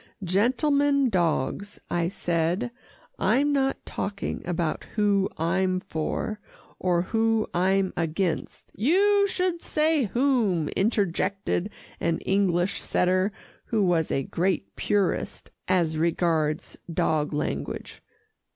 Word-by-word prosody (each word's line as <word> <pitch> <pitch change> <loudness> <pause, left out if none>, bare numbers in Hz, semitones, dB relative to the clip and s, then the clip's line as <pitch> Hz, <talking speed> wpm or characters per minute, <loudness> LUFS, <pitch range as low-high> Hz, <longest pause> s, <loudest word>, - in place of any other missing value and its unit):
"Gentlemen 275 - +2
dogs," 180 +3 -1
I 170 -1 +1
said, 175 +6 -1 0.5
"I'm 290 +2 +2
not 270 -1 0
talking 200 0 -4
about 170 -3 -1
who 200 -2 +2
I'm 185 +3 +1
for, 185 +6 -3 0.4
or 175 -2 +1
who 225 +2 +1
I'm 190 +1 +2
against 165 +1 -2
" - - -25
"You 400 +3 +4
should 365 -3 -1
say 305 -3 +2
'whom,'" 220 - +1
interjected 195 -2 0 0.3
an 165 -1 0
English 190 -2 +1
setter 185 +3 +1 0.3
who 220 -3 +1
was 170 -4 +2
a 135 - 0
great 185 +6 -1
purist 200 -4 -1 0.2
as 160 -4 +1
regards 160 -2 0
dog 155 -2 +1
language. 150 - -4
190 Hz, 105 wpm, -26 LUFS, 170-225 Hz, 0.5 s, You